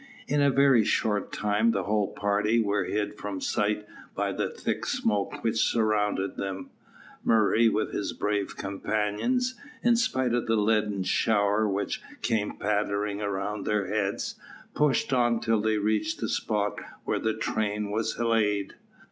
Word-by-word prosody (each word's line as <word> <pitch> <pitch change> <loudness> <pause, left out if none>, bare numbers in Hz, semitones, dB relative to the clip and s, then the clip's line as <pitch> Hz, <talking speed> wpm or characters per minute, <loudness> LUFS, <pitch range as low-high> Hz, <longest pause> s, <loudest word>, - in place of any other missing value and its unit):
In 145 +2 +2
a 140 - +5
very 135 -4 +5
short 105 -1 0
time 105 +2 +1
the 100 - -1
whole 105 +1 +1
party 105 +3 +1
were 100 -3 +1
hid 105 +1 -2
from 100 -2 -4
sight 105 +2 0 0.3
by - - 0
the - - -2
thick - - -3
smoke 105 -3 -1
which 115 -1 0
surrounded 105 -4 +1
them. 95 -1 -5 0.5
Murray, 115 +1 +4
with 110 0 -1
his 100 - -2
brave 105 -1 -2
companions, 105 - -1 0.3
in 240 -1 +5
spite 130 - +1
of 120 -1 0
the 115 - +3
leaden 105 -2 +1
shower 105 +1 +2
which 100 +1 -2 0.2
came 105 -2 0
pattering 105 0 -1
around 100 0 -3
their 105 -2 +1
heads, 100 0 -2 0.3
pushed 145 -2 +1
on 120 -2 +3
till 115 -2 +1
they 110 0 +1
reached 110 +10 0
the 110 - -2
spot 105 -2 -1 0.3
where - - 0
the 110 0 0
train 105 -2 -1
was 110 +1 -1
laid. 110 -3 +1
105 Hz, 150 wpm, -27 LUFS, 100-115 Hz, 0.5 s, a